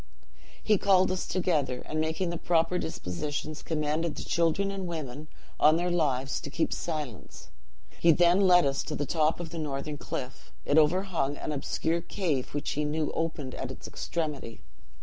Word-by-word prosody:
"He 210 -3 +3
called 190 -2 +4
us 185 - -2
together, 150 -9 0
and 155 0 -1
making 160 +3 -1
the 170 - -4
proper 170 +1 +2
dispositions, 145 - -4
commanded 155 +1 -1
the - - -5
children 170 +4 +1
and 195 -2 -4
women, 155 -3 -5 0.3
on 155 +2 +6
their 175 +1 0
lives, 140 -5 0
to - - -6
keep 160 +3 0
silence. 145 - -5 0.5
He 170 - +6
then 175 +3 +5
led 180 -3 +6
us 140 0 +1
to 150 - -3
the 145 - -1
top 160 +1 +1
of 170 -2 -6
the 165 - -5
northern 145 0 -3
cliff; 125 0 -6
it 145 - +5
overhung 160 -3 +1
an - - -4
obscure 160 +3 -1
cave 165 -7 -2
which 145 - -2
he 150 - -1
knew 150 +1 -1
opened 155 -5 -2
at - - -4
its - - -8
extremity. 150 - -4
160 Hz, 170 wpm, -29 LUFS, 145-175 Hz, 0.5 s, on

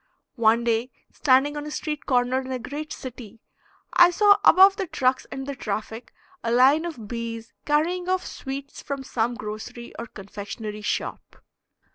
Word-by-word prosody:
One 230 0 +4
day, 235 +1 +1 0.2
standing 285 +1 +3
on 295 0 -5
a - - -4
street 300 0 -4
corner 255 0 +2
in 260 0 -7
a 260 - -1
great 290 +5 -6
city, 235 -4 -8 0.5
I 350 0 +8
saw 405 +3 +5
above 385 +3 +8
the 385 -3 -2
trucks 260 -6 0
and 270 -1 -5
the 280 - -4
traffic 220 0 -5 0.3
a 230 - -1
line 270 +7 +5
of 250 -11 -6
bees 230 0 -5
carrying 345 +5 +1
off 370 0 0
sweets 275 0 -7
from 275 -1 -5
some 240 -2 -1
grocery 225 +1 -7
or 235 - -5
confectionery 210 +1 -7
shop. 210 - -4
255 Hz, 160 wpm, -25 LUFS, 230-300 Hz, 0.5 s, I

